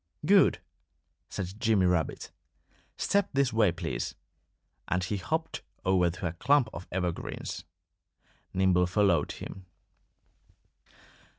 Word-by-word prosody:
"Good!" 195 +3 +5 0.7
said 95 +2 -5
Jimmy 110 -5 +3
Rabbit. 90 -4 0 0.7
"Step 200 -1 +1
this 135 -3 +2
way, 110 -5 +4
please!" 85 -8 -4 0.7
And 90 0 0
he 100 +3 -2
hopped 160 - -2 0.2
over 95 -2 +3
to 90 +3 -6
a 85 - -1
clump 125 +6 +3
of 90 - -8
evergreens. 90 -2 -3 0.9
Nimble 90 -1 +3
followed 90 -5 +2
him. 95 -1 -9
95 Hz, 105 wpm, -29 LUFS, 90-110 Hz, 0.9 s, Good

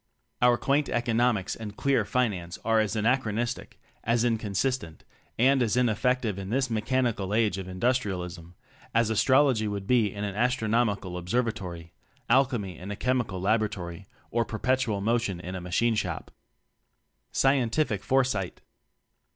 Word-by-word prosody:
Our 120 0 +5
quaint 140 +3 +1
"economics" 120 -3 +1
and 105 -2 -8
queer 135 -6 +2
"finance" 100 -8 -1
are 115 -1 +3
as 110 0 0
anachronistic, 115 +1 -1 0.2
as 115 0 +2
inconsistent, 110 -4 -1 0.3
and 130 +3 +4
as 115 0 +1
ineffective 120 -2 +1
in 95 0 -6
this 130 +1 0
Mechanical 110 -3 0
Age 105 -4 +2
of 95 - -6
Industrialism, 90 -5 -2 0.4
as 115 -1 +3
astrology 130 0 +3
would 100 -1 -4
be 115 -3 +3
in 100 +1 -5
an 100 -1 -2
astrono 120 +1 +2
mical 90 -3 -6
observatory, 90 -5 -3 0.4
alchemy 120 -9 +2
in 90 +3 -8
a 105 - -3
chemical 125 -6 -1
laboratory 100 -3 -1 0.2
or 120 0 +2
"perpetual 115 -2 0
mo 115 +4 +2
tion" 100 -7 -3
in 90 +1 -6
a 95 - -5
machine 100 +7 +1
shop. 110 - -3 1.0
Scientific 130 -4 +1
Foresight. 125 -9 0
110 Hz, 135 wpm, -27 LUFS, 100-125 Hz, 1.0 s, Our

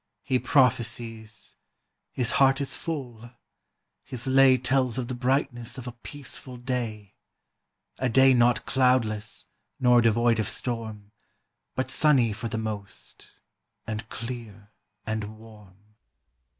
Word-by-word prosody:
"He 130 -2 +1
prophesies, 115 -5 0 0.5
his 120 -2 +1
heart 135 0 +5
is 140 - 0
full; 125 -8 -5 0.7
his 125 -3 -3
lay 135 0 +6
Tells 130 -1 +1
of 125 -2 -2
the - - -2
brightness 125 -1 -1
of 130 - -7
a 125 - -5
peaceful 130 +1 -6
day; 120 -5 -4 0.9
A 130 - +1
day 130 +3 +6
not 120 -2 +3
cloudless, 115 -5 +1 0.3
nor 125 -1 +5
devoid 115 0 +3
of 110 - 0
storm, 110 -4 -4 0.6
But 130 0 -1
sunny 130 -5 +4
for 115 +3 -5
the 110 - -3
most, 110 -3 -7 0.4
and 110 0 -5
clear 115 -4 -7 0.3
and 110 -1 -4
warm." 105 -4 -16
120 Hz, 120 wpm, -26 LUFS, 110-130 Hz, 0.9 s, lay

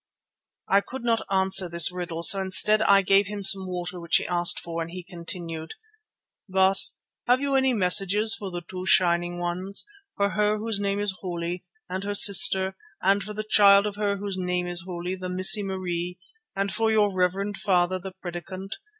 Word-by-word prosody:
I 200 +1 +2
could 260 +4 -10
not 230 -1 -1
answer 190 -1 +1
this 170 0 +5
riddle, 175 -2 -6
so 195 +2 +5
instead 210 +3 +3
I 200 -2 +3
gave 195 +1 +2
him 205 0 -7
some 190 -1 +4
water 180 0 -6
which 170 -1 -1
he - - -5
asked 175 -1 +1
for, 170 0 -7
and 165 - -6
he 180 +1 -9
continued: 170 -2 -7 0.7
"Baas, 190 +1 +4 0.3
have 250 +1 +2
you 280 0 -3
any 265 -1 +1
messages 205 +1 +3
for 205 -3 -7
the 175 -1 -8
two 185 0 -8
Shining 175 -1 +1
ones, 180 +3 -2 0.3
for 200 0 -1
her 210 0 -1
whose 215 -1 -3
name 200 0 -3
is 205 -1 -3
holy 175 -1 -6 0.2
and 185 +1 -6
her 205 0 -4
sister, 190 -1 +7 0.3
and 195 +2 +1
for 210 +2 -8
the 215 +1 -6
child 200 -1 +4
of 210 -1 -5
her 205 -1 -2
whose 200 -1 -6
name 180 0 -3
is 175 -1 -6
holy, 180 0 -6
the 185 -1 -7
Missie 185 +3 +3
Marie, 180 -2 -5 0.4
and 195 0 -3
for 225 +1 -1
your 210 -2 +1
reverend 190 +2 -2
father, 185 -2 -1
the 190 +1 -9
Predikant? 185 +1 -9
190 Hz, 185 wpm, -23 LUFS, 180-200 Hz, 0.7 s, sister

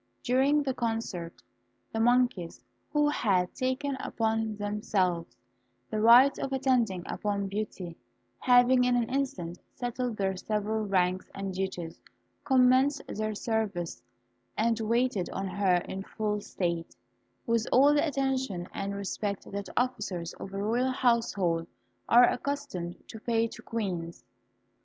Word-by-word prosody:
During 270 +4 +3
the 265 -2 -1
concert, 225 -8 -3 0.5
the 225 - -1
monkeys, 240 -7 +2 0.3
who 295 -1 +3
had 190 -10 +1
taken 265 +1 -1
upon 220 -1 -1
themselves 200 -4 -1 0.5
the 215 - -1
right 245 +5 +7
of 270 - -3
attending 250 -9 +1
upon 200 -1 -2
Beauty, 195 -4 -4 0.4
having 250 0 +5
in 250 0 +3
an 240 -2 +1
instant 185 -11 -2 0.2
settled 245 -1 -3
their 190 -1 0
several 215 +2 -2
ranks 185 -1 +1
and 195 -1 -4
duties, 180 -3 -4 0.4
commenced 260 +2 +4
their 215 0 -2
service, 205 -6 -2 0.6
and 230 +1 +2
waited 225 -4 +1
on 195 - -3
her 190 -1 +2
in 190 - -4
full 210 +1 -2
state, 170 -4 -3 0.5
with 230 -1 +1
all 280 +3 +6
the 295 +1 +3
attention 265 - -1
and 200 0 -3
respect 200 0 -3
that 200 -1 -5
officers 200 -9 -1
of 195 - -7
a 195 +1 -3
royal 240 +5 +1
household 225 -10 +1 0.4
are 245 +1 +8
accustomed 250 -11 -4
to 220 - -9
pay 230 0 +1
to - - -11
queens. 180 -7 -4
220 Hz, 130 wpm, -29 LUFS, 190-250 Hz, 0.6 s, are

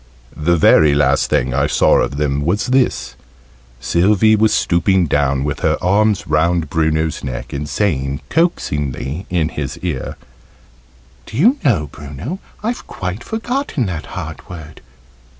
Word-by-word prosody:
The 85 +3 +1
very 75 -2 +5
last 75 - +2
thing 65 0 +1
I 70 +3 +1
saw - - +3
of 70 - -1
them 70 -1 0
was 90 +7 0
this 130 -1 +1 0.7
Sylvie 95 - +3
was 110 0 +3
stooping 90 +1 +2
down 70 -2 +1
with 70 -1 -3
her - - +1
arms 100 +2 +2
round 80 +1 +1
Bruno's 80 -1 0
neck, 65 -2 -5
and 75 +1 -4
saying 70 -5 -1
coaxingly 75 - -1
in 85 -4 0
his 75 -3 -5
ear, 80 -8 -3 1.1
"Do - - -7
you 240 - +4
know, 105 - +2
Bruno, 75 - -7 0.2
I've 235 +3 -3
quite 95 +5 -5
forgotten 225 - -2
that 85 -5 -5
hard - - -7
word. 80 -4 -10
85 Hz, 140 wpm, -18 LUFS, 75-105 Hz, 1.1 s, very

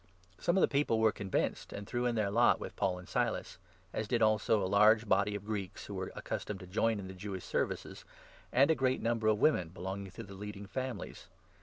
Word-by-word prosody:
Some 170 +2 +1
of - - +4
the - - +6
people 140 -5 +1
were 110 -1 +5
convinced, 100 -2 -2
and 100 - -6
threw 120 +4 -1
in 120 - 0
their 105 -3 +1
lot 120 +3 +4
with - - -6
4 - - -32
Paul 90 -1 0
and 90 - -11
Silas, - - -1 0.3
as 110 - -2
did 115 +1 +2
also 110 0 +3
a - - 0
large 105 +3 +5
body 100 +1 +2
of 100 0 -6
Greeks 100 -3 -4
who 105 - -7
were 95 -1 -4
accustomed 100 -2 -4
to - - -8
join 110 +4 +1
in 95 - -6
the 95 - -7
Jewish 95 -1 -6
services, - - -2 0.5
and 140 +5 +5
a - - +6
great 130 -2 0
number 115 -1 +1
of 110 -1 +4
women 105 - +3
belonging 95 +2 -5
to - - -7
the 100 - -11
leading 100 +1 -7
families. 130 +4 -5
105 Hz, 225 wpm, -33 LUFS, 95-115 Hz, 0.5 s, the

